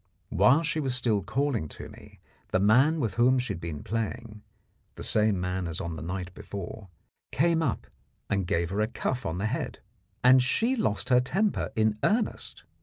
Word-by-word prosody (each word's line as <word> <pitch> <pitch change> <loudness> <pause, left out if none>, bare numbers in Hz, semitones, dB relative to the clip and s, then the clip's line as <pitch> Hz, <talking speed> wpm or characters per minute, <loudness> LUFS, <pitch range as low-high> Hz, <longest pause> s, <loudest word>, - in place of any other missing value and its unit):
While 125 - +4
she 160 0 -1
was 135 -4 -1
still 115 -5 +1
calling 115 - -1
to - - -8
me, - - -15 0.3
the 95 - +1
man 130 +11 +4
with 115 -7 -1
whom 125 +2 +4
she 125 -4 -1
had 85 - -8
been 80 -4 -5
playing 115 0 -4 0.5
the - - -8
same 105 -3 +2
man 90 0 -2
as 80 -1 -3
on 85 -1 -4
the 75 - -7
night 90 +2 -5
before 100 +1 -8 0.4
came 165 +3 +2
up 140 -7 -1 0.4
and 100 -3 -1
gave 85 +1 0
her 100 +2 0
a 105 - +2
cuff 125 +2 -3
on 80 +1 -3
the 100 - -2
head, 115 +5 -3 0.5
and 130 +1 +7
she 230 - +1
lost 110 - -1
her 125 -1 +5
temper 195 +11 0
in 110 -1 +1
earnest. 220 +2 -1
110 Hz, 185 wpm, -28 LUFS, 95-130 Hz, 0.5 s, and